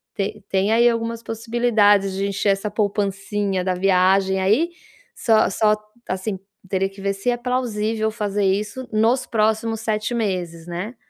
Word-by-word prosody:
te 205 +1 -3
tem 195 +2 +1
aí 235 +1 +5
algumas 230 0 -3
possibilidades 225 -4 +2
de 195 +1 -1
encher 200 +1 0
essa 195 +2 -1
poupancinha 200 -2 -1
da 185 0 0
viagem 190 +1 +3
aí, 220 - +3 0.5
só 220 -2 +3
só, 210 +2 +3 0.3
assim, 190 +1 -3 0.3
teria 195 0 +1
que 195 0 -13
ver 200 0 0
se 195 +5 -2
é - - +1
plausível 225 -3 -1
fazer 205 -2 -1
isso 210 +6 -1
nos 225 +4 +2
próximos 220 0 0
7 215 +1 -1
meses, 180 -7 -3
né, 180 +8 -5
210 Hz, 150 wpm, -22 LUFS, 195-225 Hz, 0.5 s, aí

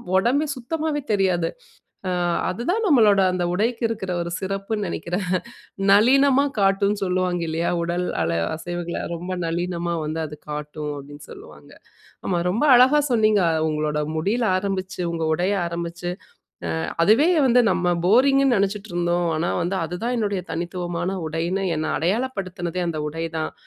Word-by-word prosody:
ஒடம்பே 255 +10 +3
சுத்தமாவே 300 +4 -2
தெரியாது. 185 -4 +1 0.6
அ, - - 0 0.4
அது 190 +6 -3
தான் 450 +4 0
நம்மளோட 215 - +5
அந்த 180 -1 -1
உடைக்கு 230 +5 0
இருக்கிற 200 -5 -4
ஒரு 170 - -5
சிறப்புன்னு 195 +2 -3
நெனைக்கிறேன். 180 +2 -3 0.6
நளினமா 270 +6 +5
காட்டும்ன்னு 200 +1 +2
சொல்லுவாங்க 180 -1 0
இல்லையா? 165 +2 -1
"உடல் 175 +1 -1 0.2
அள 85 0 0 0.2
அசைவுகள, 175 +1 -5 0.2
ரொம்ப 180 +2 -5
நளினமா 170 +1 -2
வந்து 155 +2 -3
அது 150 0 -10
காட்டும்." 150 0 -5
அப்படீன்னு 145 +1 -10
சொல்லுவாங்க. - - -13 0.6
ஆமா, 175 -2 +1
ரொம்ப 225 +10 0
அழகா 260 +5 +6
சொன்னீங்க. 215 -3 +3 0.3
உங்களோட 150 0 -1 0.2
முடியில 215 +9 0
ஆரம்பிச்சு, 190 -1 -3
உங்க 165 -1 -2
உடைய 185 +5 0
ஆரம்பிச்சு 170 +1 -4 0.6
"அ, - - -2 0.4
அதுவே 240 - +5 0.2
வந்து 245 0 +5
நம்ம 180 - 0 0.2
போரிங்குன்னு 270 +3 +4
நெனைச்சுட்டுருந்தோம். 175 -4 -1
ஆனா 170 +2 -1
வந்து 185 +3 -1
அதுதான் 205 +9 -3
என்னுடைய 200 -3 -1
தனித்துவமான 175 +2 -3
உடைன்னு, 170 +5 -2
என்னை 155 0 -2
அடையாளப்படுத்தினதே 185 - -2
அந்த 155 -2 -3
உடை 165 +2 -4
தான்!" 155 - -3
185 Hz, 135 wpm, -23 LUFS, 170-215 Hz, 0.6 s, அழகா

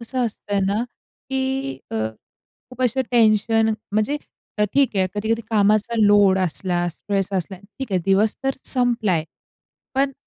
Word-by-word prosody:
कसं 245 +2 -2
असतंय 205 -2 -3
ना, 205 +4 0 0.5
की 265 +1 -1
अ, - - -5 0.8
खूप 255 0 -5
अशा 255 +2 +2
टेन्शन 225 -1 +3 0.2
म्हणजे 215 +8 +1 0.4
अ, 210 - +4
ठीक 275 -7 +3
आहे 190 -1 +3
कधी-कधी 225 +2 -1
कामाचा 215 +2 +2
लोड 205 -2 +5
असला, 175 0 -1
स्ट्रेस 195 +3 -2
असला 190 0 -2
ठीक 205 +3 -9
आहे, 185 - +2
दिवस 200 +2 +2
तर 270 - 0
संपलाय. 230 - +1 0.7
पण 275 +1 +1
215 Hz, 140 wpm, -22 LUFS, 195-245 Hz, 0.8 s, लोड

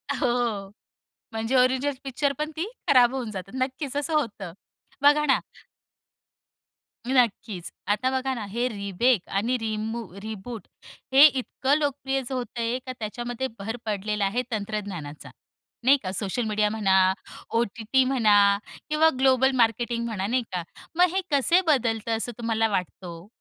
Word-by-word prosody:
हो, 240 -6 -1 0.6
म्हणजे 225 +3 -2
original 260 +3 +3
picture 275 +2 -1
पण 305 +1 -2
ती 330 +4 -2 0.2
खराब 250 -3 +5
होऊन 240 -5 -3
जाते. 190 0 -7
नक्कीच 265 +2 -2
असं 295 +3 -1
होतं. 210 - -2 0.5
बघा 295 +1 +5
ना. 275 - +4 1.7
नक्कीच. 225 -7 0 0.2
आता 210 +6 +1
बघा 265 0 -1
ना 225 -5 -5
हे 240 +3 0
रिमेक 200 +1 0
आणि 230 +6 0
रिमू 225 +1 -3 0.2
रिबूट 220 -1 -7 0.5
हे 275 +2 +10
इतकं 270 0 0
लोकप्रियच 270 -3 -2
होत 250 -2 -2
आहे 235 +1 0
का 255 - -4
त्याच्यामध्ये 240 +4 -4
भर 225 +4 -4
पडलेला 210 0 -1
आहे 215 +6 0
तंत्रज्ञानाचा, 200 -8 -5 0.5
नाही 270 +3 +6
का 185 - -3
सोशल 200 +5 -1
मीडिया 210 0 +1
म्हणा, 190 -3 +3 0.4
ओ-टी-टी 230 +3 +1
म्हणा 205 -6 +4 0.3
किंवा 310 +1 +4
ग्लोबल 265 0 +4
मार्केटिंग 235 0 +1
म्हणा 205 -4 -2
नाही 245 +2 +1
का. 180 -2 -2 0.3
मग 360 0 +4
हे 385 - +2
कसे 310 +6 +4
बदलतं 230 -6 +1
असं 240 +2 -2
तुम्हाला 225 -1 +1
वाटतं 185 -2 -3
हो? 170 +2 -9
235 Hz, 140 wpm, -25 LUFS, 210-265 Hz, 1.7 s, हे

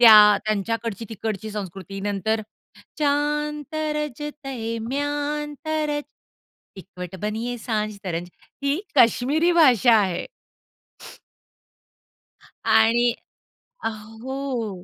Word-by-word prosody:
त्या, 210 -3 +9
त्यांच्याकडची 225 +1 -1
तिकडची 220 -1 -4
संस्कृती, 195 -1 -6
नंतर 205 +2 0 0.6
चांद 295 +1 +1
तराजतयं 295 -6 -3
म्यानतरज 295 +1 -2 0.8
ईकवट 180 -1 -8
बनिये 225 +4 -2
सांज 215 -3 -2
तरंज 175 -1 -3 0.3
ही 280 +5 +1
काश्मिरी 285 +7 +4
भाषा 255 - +6
आहे. 185 -3 -1 2.4
आणि 235 +2 +5 0.7
अ, - - +1
हो. 225 -2 -5
230 Hz, 75 wpm, -24 LUFS, 210-290 Hz, 2.4 s, त्या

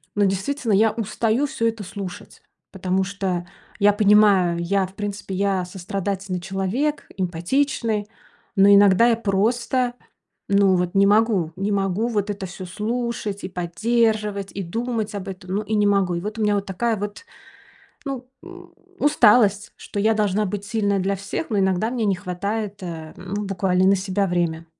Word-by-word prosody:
ну 205 - +3
действительно, 220 +6 -1
я 215 +2 +4
устаю 225 +4 0
всё 230 -4 -1
это 225 -2 -3
слушать, 190 -1 -8 0.3
потому 190 0 0
что 185 -3 -3 0.3
я 205 +1 +6
понимаю, 205 -4 +4
я, 190 +2 +1
в 190 - -12
принципе, 205 -1 -5
я 195 -2 0
сострадательный 190 0 -4
человек, 195 +11 -2
эмпатичный, 210 - -1 0.5
но 195 +1 +6
иногда 200 +3 +6
я 230 - +4
просто, 235 +4 0 0.5
ну 200 -1 +4
вот, 180 +1 -1
не 200 0 +5
могу, 205 -5 +3
не 195 +2 -2
могу 195 +3 0
вот 210 -3 -1
это 195 -1 -5
всё 185 +1 -8
слушать 215 +1 -3
и 185 - -4
поддерживать, 210 +2 0
и 195 - -4
думать 225 +3 -3
об 200 -1 -5
этом. 185 -1 -8
Ну 210 - 0
и 215 +1 -2
не 210 -1 +3
могу. 195 -3 +2
И - - -2
вот 215 +3 -5
у - - -1
меня 210 -1 +2
вот 200 0 -1
такая 220 +4 -1
вот, 205 - -6 0.8
ну, 260 -2 -4 0.2
м, 360 -1 -12 0.3
усталость, 215 -7 +4
что 205 - -5
я 220 +2 +3
должна 210 -1 +1
быть 200 +1 -4
сильной 205 -2 0
для 195 +1 0
всех, 200 - -5
но 210 - +1
иногда 190 +3 +1
мне 240 -3 -1
не 195 - +2
хватает, 200 +2 -4
э, 160 -3 -6
ну, 190 +3 -5
буквально 185 -1 +1
на 195 - +6
себя 195 +1 -1
время. 170 -2 -1
200 Hz, 170 wpm, -22 LUFS, 190-220 Hz, 0.8 s, я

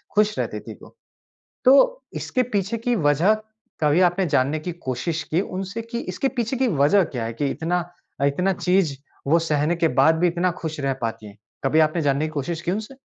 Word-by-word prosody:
ख़ुश 210 0 +2
रहती - - -2
थी - - -9
वो। - - -15 0.7
तो - - +5 0.2
इसके 255 -1 0
पीछे 200 +3 0
की 240 +1 0
वजह 160 +4 +3 0.5
कभी 150 +3 +3
आपने 185 +2 0
जानने 145 +1 +1
की 175 +3 -5 0.2
कोशिश 155 +6 -2
की 170 - +2
उनसे 195 +4 -5
कि 235 +1 -5
इसके 270 - 0
पीछे 235 +2 -1
की 265 - +2
वजह 160 - +4
क्या 120 -3 -2
है 115 - -4
कि 140 +5 -1
इतना 175 +2 -1 0.4
अ, - - +3
इतना 180 +7 +1
चीज़ 180 -6 +1 0.3
वो 160 +4 +5
सहने 155 0 0
के 170 -1 +2
बाद 160 - +5
भी 180 - +4
इतना 175 +1 +1
ख़ुश 160 -2 -4
रह 135 -1 0
पाती 115 -1 -4
हैं, 105 +1 -14 0.3
कभी 135 +3 +3
आपने 155 +2 +2
जानने 145 0 +1
की - - -3
कोशिश 155 +3 -3
की 175 - -2
उनसे? 220 +6 -4
170 Hz, 205 wpm, -23 LUFS, 145-200 Hz, 0.7 s, तो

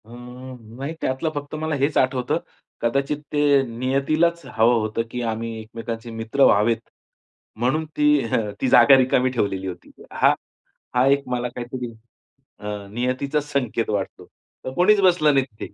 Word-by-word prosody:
अ, - - -20
नाही 125 +2 -8
त्यातलं 130 +5 -1
फक्त 145 +1 -5
मला 155 0 -2
हेच 140 +2 0
आठवतं. 130 -1 +1 0.4
कदाचित 140 +5 0 0.2
ते 145 -2 +4
नियतीलाच 140 +7 0
हवं 120 -1 +3
होतं, 110 +1 -1
की 125 - -4
आम्ही 115 0 -3
एकमेकांचे 115 +1 -7
मित्र 115 +5 0
व्हावेत, 110 +1 +4 0.8
म्हणून 135 +7 +1
ती 150 - +2 0.3
हं, 105 -2 0
ती 130 - +1
जागा 135 +2 +7
रिकामी 130 0 +2
ठेवलेली 95 -6 -1
होती 90 - -8 0.2
हा, - - +4 0.6
हा 125 +1 +4
एक 140 0 +3
मला 125 0 -1
काहीतरी 125 0 -5 0.7
अ, 105 -1 -6
नियतीचाच 130 +5 -1
संकेत 120 -5 -1
वाटतो. 100 -2 -3 0.4
तर 130 - -4
कोणीच 190 +7 +4
बसलं 175 -5 +4
नाही 135 -1 +3
तिथे. 105 -5 -10
125 Hz, 150 wpm, -22 LUFS, 115-140 Hz, 0.8 s, जागा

